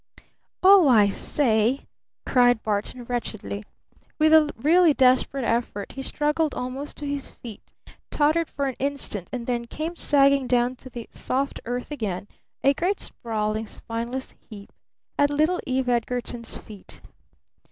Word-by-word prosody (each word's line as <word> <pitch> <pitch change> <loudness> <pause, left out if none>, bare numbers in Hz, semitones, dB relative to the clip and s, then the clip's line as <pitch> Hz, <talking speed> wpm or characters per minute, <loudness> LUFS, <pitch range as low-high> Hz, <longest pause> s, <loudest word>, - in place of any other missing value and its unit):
"Oh, 380 -4 +8
I 215 -6 +6
say!" 230 +2 +1 0.4
cried 245 -3 +3
Barton 215 +4 -2
wretchedly. 230 -4 -4 0.6
With 310 0 +4
a 305 -2 +6
really 320 +4 +4
desperate 260 +1 +3
effort 230 -3 -2
he 270 - -7
struggled 300 +2 0
almost 260 +3 -5
to 295 - -6
his 285 -1 -4
feet, 225 -4 -10 0.5
tottered 310 +2 +2
for 280 - -3
an 265 -2 -2
instant, 265 -9 -3
and 245 -2 -4
then 240 -1 -2
came 315 +8 -5
sagging 275 -4 +3
down 245 0 +2
to 260 - -12
the 235 -2 -8
soft 275 +2 -2
earth 245 +4 -4
again 205 -8 -4 0.4
a 275 - +5
great, 360 +7 -1
sprawling, 215 -1 -3
spineless 235 +5 -5 0.2
heap, 205 -3 -11 0.5
at 285 0 +4
little 310 +5 +1
Eve 260 0 0
Edgarton's 240 -1 -2
feet. 205 -3 -12
255 Hz, 140 wpm, -24 LUFS, 230-285 Hz, 0.6 s, Oh